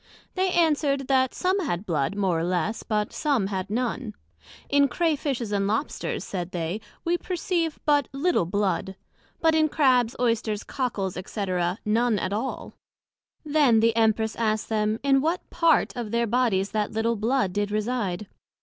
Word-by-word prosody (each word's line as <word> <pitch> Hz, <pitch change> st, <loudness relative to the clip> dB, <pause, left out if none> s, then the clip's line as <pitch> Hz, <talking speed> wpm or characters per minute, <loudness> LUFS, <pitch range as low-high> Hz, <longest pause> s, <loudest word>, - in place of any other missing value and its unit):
They 375 Hz, 0 st, +1 dB
answered, 295 Hz, -5 st, +2 dB
That 260 Hz, -1 st, +2 dB
some 375 Hz, +2 st, +1 dB
had 210 Hz, -, -2 dB
blood, 155 Hz, -1 st, -1 dB
more 190 Hz, -5 st, +1 dB
or -, -, -1 dB
less, 180 Hz, +4 st, -1 dB
but 210 Hz, -2 st, -2 dB
some 280 Hz, -9 st, +1 dB
had 190 Hz, -1 st, -3 dB
none. 235 Hz, 0 st, -2 dB, 0.5 s
In 285 Hz, 0 st, +4 dB
Crea 325 Hz, +3 st, +1 dB
fishes 260 Hz, -7 st, -3 dB
and 200 Hz, -1 st, +1 dB
Lobsters, 220 Hz, +8 st, -2 dB
said 180 Hz, -3 st, -4 dB
they, 175 Hz, +4 st, -3 dB, 0.2 s
we 345 Hz, +1 st, +1 dB
perceive 345 Hz, -3 st, -1 dB
but 290 Hz, -3 st, +3 dB
little 275 Hz, -, +1 dB
blood; 195 Hz, 0 st, -1 dB, 0.5 s
but 320 Hz, -1 st, +4 dB
in 315 Hz, -1 st, +3 dB
Crabs, 255 Hz, -6 st, +3 dB
Oysters, 230 Hz, -3 st, 0 dB
Cockles, 205 Hz, -9 st, -3 dB
&c. 205 Hz, +1 st, -4 dB, 0.4 s
none 225 Hz, +1 st, +2 dB
at 195 Hz, -, -2 dB
all. 230 Hz, +6 st, -4 dB, 0.7 s
Then 290 Hz, -7 st, +4 dB
the 225 Hz, 0 st, +3 dB
Empress 220 Hz, -1 st, +2 dB
asked 220 Hz, -2 st, 0 dB
them, 215 Hz, 0 st, 0 dB
in 270 Hz, -1 st, +4 dB
what 330 Hz, +5 st, -1 dB
part 330 Hz, -5 st, +2 dB
of 240 Hz, -3 st, -4 dB
their 235 Hz, +2 st, +1 dB
Bodies 220 Hz, -4 st, +1 dB
that 210 Hz, -1 st, -1 dB
little 225 Hz, +1 st, 0 dB
blood 225 Hz, -2 st, 0 dB
did 205 Hz, +1 st, -1 dB
reside? 210 Hz, -3 st, -2 dB
230 Hz, 160 wpm, -25 LUFS, 205-280 Hz, 0.7 s, In